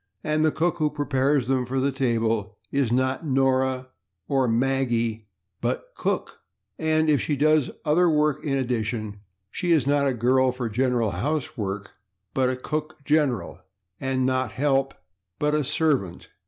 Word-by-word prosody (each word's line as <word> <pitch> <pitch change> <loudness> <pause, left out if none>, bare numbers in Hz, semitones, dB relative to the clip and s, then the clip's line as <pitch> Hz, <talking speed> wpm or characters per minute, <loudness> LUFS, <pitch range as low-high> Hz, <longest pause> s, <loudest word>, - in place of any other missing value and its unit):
And 155 0 +1
the 155 - +3
cook 175 +3 0
who 155 -1 +2
prepares 145 -2 +1
them 130 0 +1
for 135 +1 -1
the 140 +2 +1
table 115 -5 0
is 140 -4 +1
not 130 +4 +1
/Nora/ 130 -2 +1 0.4
or 135 -2 +2
/Maggie/, 120 -2 0 0.4
but - - -3
/Cook/, - - -2 0.4
and 155 0 +2
if 150 -3 +3
she 150 - 0
does 150 -1 +3 0.2
other 170 +4 +4
work 150 -2 +1
in 140 -3 0
addition 110 -4 -2 0.3
she 175 -2 -1
is 155 -6 +4
not 140 0 +2
a 130 - 0
/girl 130 +2 +3
for 125 -2 -4
general 120 -1 +1
housework/, 105 - -3 0.4
but 130 -1 +2
a 130 - -1
/cook 155 +3 -5
general/, 145 - +1 0.4
and 130 -1 0
not 130 -2 0
/help/, 135 -1 +1 0.4
but 150 0 0
a 150 - +3
/servant 140 - 0
135 Hz, 155 wpm, -25 LUFS, 120-150 Hz, 0.4 s, other